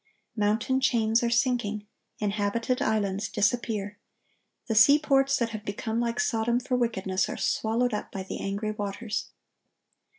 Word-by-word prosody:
Mountain 220 +5 +1
chains 230 -3 +2
are 235 - +1
sinking. 235 -4 0 0.3
Inhabited 210 +4 -1
islands 205 -2 0
disappear. 210 -1 -1 0.7
The 225 - 0
seaports 275 +3 +5
that 235 -1 0
have 215 -2 -6
become 220 +2 -3
like 235 -1 -1
Sodom 235 - +1
for 250 0 -2
wickedness, 195 -6 0
are - - -4
swallowed 230 +2 0
up 210 - -4
by 195 - -5
the 185 - -6
angry 200 +2 -2
waters. 210 +1 -4
220 Hz, 135 wpm, -27 LUFS, 205-240 Hz, 0.7 s, seaports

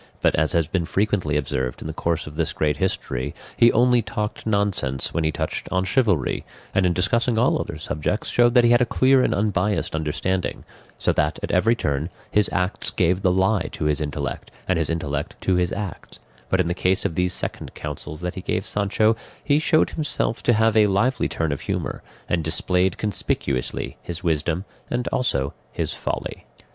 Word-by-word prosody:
But, - - +3
as 80 +2 +3
has 85 -3 +2
been 90 0 -1
frequently 95 -5 0
observed 65 -3 -2
in - - -9
the 80 - -4
course 85 +1 -1
of 75 - -9
this 80 -1 -1
great 75 -1 0
history, 70 -7 -2 0.2
he 120 - +6
only 125 +1 +4
talked 105 0 -4
nonsense 100 - 0
when 85 - 0
he 80 - +2
touched - - -3
on 95 0 +1
chivalry, 95 - +1 0.3
and 95 -2 +3
in 90 - +2
discussing 115 +6 +1
all 120 - +3
other - - -5
subjects 75 +8 -2
showed 120 0 +4
that 125 - +7
he 120 - +5
had 120 +1 +5
a - - +5
clear 130 0 +4
and - - +2
unbiassed 105 0 0
understanding; 80 +4 -2 0.3
so - - +1
that 75 0 +1
at - - -2
every 115 +6 +3
turn 75 - -1 0.2
his 105 -1 +3
acts 90 0 0
gave 90 +1 +1
the 95 -2 +3
lie 95 +2 +2
to - - -4
his 75 0 +1
intellect, 75 -3 -4 0.2
and 90 -3 +2
his 80 - 0
intellect 75 -3 -2
to 95 - +1
his 90 -1 +1
acts; 100 -3 -6 0.3
but 95 - +2
in 90 - +2
the 85 - 0
case 95 +2 +1
of - - 0
these 90 +2 +1
second - - -2
counsels 75 +1 -5
that 90 0 -3
he 95 - -6
gave - - -2
Sancho, 105 +2 +2 0.3
he 145 0 +3
showed 155 0 +3
himself 145 -7 -1
to 120 - +3
have 110 0 +3
a 105 -1 +6
lively 115 +7 +1
turn 80 -2 -1
of 70 - -3
humour, - - -3 0.3
and 85 -2 0
displayed 90 +3 +1
conspicuously 70 -10 -2
his 85 +1 -6
wisdom, 80 +2 0 0.2
and 120 0 -1
also 70 - 0 0.2
his - - -2
folly. - - -4
90 Hz, 195 wpm, -23 LUFS, 80-105 Hz, 0.3 s, that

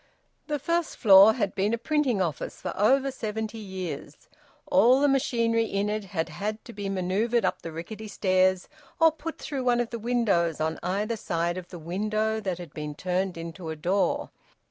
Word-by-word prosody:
The 300 -1 -1
first 335 +4 -1
floor 200 0 +8
had 205 -6 -1
been 205 +4 +1
a - - -7
printing 255 -6 +1
office 160 -4 -4
for - - -4
over 270 +6 +3
seventy 220 -2 -4
years. 190 -4 -7 0.4
All 265 -2 +5
the 290 - +4
machinery 230 -4 +2
in 205 -1 -1
it 215 -1 -3
had 170 -4 -3
had 210 +7 -4
to 235 - -10
be 205 -2 -4
manoeuvred 195 +5 0
up - - -1
the 165 - -6
rickety 210 +7 -7
stairs, 185 -2 +2 0.3
or 325 -1 +6
put 320 +1 -7
through 275 -3 -4
one 245 -1 +3
of 240 -1 -1
the 235 - -4
windows 210 -9 +1
on 160 +1 -1
either 205 +5 -1
side 170 -3 -1
of 185 -1 -7
the 175 - -9
window 215 +6 -1
that 190 -5 -3
had 175 -5 -10
been 150 -1 -5
turned 185 +1 -1
into 165 0 -7
a 160 - -3
door. 185 +6 0
205 Hz, 190 wpm, -27 LUFS, 180-235 Hz, 0.4 s, floor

